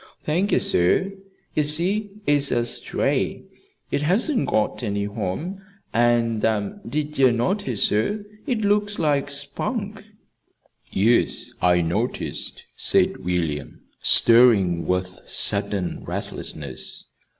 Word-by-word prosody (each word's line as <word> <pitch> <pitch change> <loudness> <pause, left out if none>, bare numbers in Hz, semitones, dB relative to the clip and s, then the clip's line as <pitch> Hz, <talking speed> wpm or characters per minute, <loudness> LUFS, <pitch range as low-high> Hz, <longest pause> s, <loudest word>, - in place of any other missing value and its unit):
"Thank 175 +7 0
ye, - - +4
sir. 135 - +1 0.4
Ye - - +2
see, 180 +8 +1 0.2
it's 145 -1 +3
a 120 -1 +1
stray. - - -1 0.5
It - - 0
hasn't 225 - +1
got 110 +3 0
any 100 -3 -2
home. 110 - -4 0.3
And, 115 -1 +2 0.5
did 150 0 -3
ye 130 -1 +6
notice, 125 - 0
sir? 205 - 0 0.2
it 240 -5 0
looks 205 0 +1
like 145 -3 +1
Spunk." 200 - -3 0.9
"Yes, 115 +5 +1
I 90 -1 +4
noticed," 85 +1 -3
said - - +2
William, 80 -5 -3 0.2
stirring 105 -8 +5
with 90 0 -2
sudden 95 -4 +1
restlessness. 70 -4 -5
125 Hz, 105 wpm, -23 LUFS, -, 0.9 s, ye